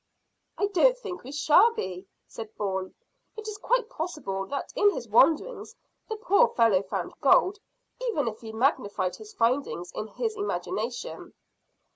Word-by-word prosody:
"I 405 - +2
don't 410 +6 +4
think 410 -7 -7
we 260 - -8
shall 305 +11 +5
be," 185 +1 -5 0.2
said 220 -1 -9
Bourne. 190 -2 -3 0.4
"It 435 0 -7
is 420 -1 -6
quite - - +1
possible 300 - -4
that 280 - -4
in 415 -5 +5
his 245 -12 -4
wanderings 300 - +2 0.3
the 440 - -2
poor 440 +1 +4
fellow 225 -6 +3
found 195 - -4
gold, 405 +3 +4 0.5
even 290 - 0
if 220 -1 -4
he 225 -1 -7
magnified 205 -6 0
his 430 0 -12
findings 230 - 0
in 215 - -5
his 445 - -3
imagination." 410 0 -4
290 Hz, 150 wpm, -27 LUFS, -, 0.5 s, shall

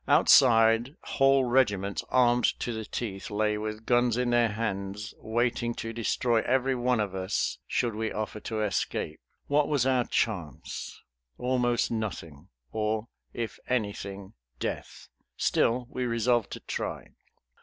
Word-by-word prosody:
Outside 115 +1 +5
whole 135 -1 +3
regiments 105 -6 +1
armed 120 -2 +3
to 120 - -2
the 110 -1 -5
teeth 100 -3 -5
lay 105 0 +1
with 110 +1 -5
guns 120 -1 +3
in 125 -1 +1
their 120 -1 +4
hands 105 -1 -3
waiting 120 +1 0
to 115 0 -5
destroy 115 0 +1
every 130 +1 +1
one 125 -1 +1
of 100 -3 -1
us 95 0 -1
should 120 -2 0
we 110 +1 -2
offer 110 0 -4
to 110 0 -3
escape. 90 -5 -2 0.3
What 145 +1 +2
was 140 -4 +1
our 130 -2 +2
chance? 90 - -3 0.4
Almost 125 -1 +1
nothing; 85 -10 -5 0.2
or 110 +1 -1 0.2
if 115 -2 -5
anything, 100 -5 -3 0.3
death! - - -5 0.3
Still 125 +2 +2
we 125 0 -3
resolved 115 -1 +1
to - - -7
try. - - -4
115 Hz, 135 wpm, -28 LUFS, 105-125 Hz, 0.4 s, Outside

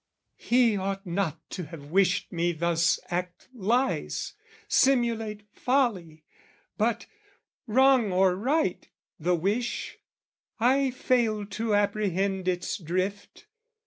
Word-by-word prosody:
He 240 -3 +3
ought 195 +1 -3
not 175 -3 -3
to 180 - -5
have 150 -2 -11
wished 190 +1 +2
me 175 -1 0
thus 170 +1 +1
act 175 0 -4
lies, 245 +4 -1 0.3
Simulate 230 -5 +2
folly, 200 - 0 0.5
but, 230 +2 0 0.6
wrong 255 -2 +4
or 185 0 +3
right, 255 - -1 0.3
the 175 +3 +1
wish, 205 +8 -2 0.6
I 265 +4 +3
failed 230 -5 0
to 220 0 0
apprehend 200 -2 0
its 180 +3 -1
drift. 185 +4 -4
200 Hz, 105 wpm, -27 LUFS, 180-235 Hz, 0.6 s, wrong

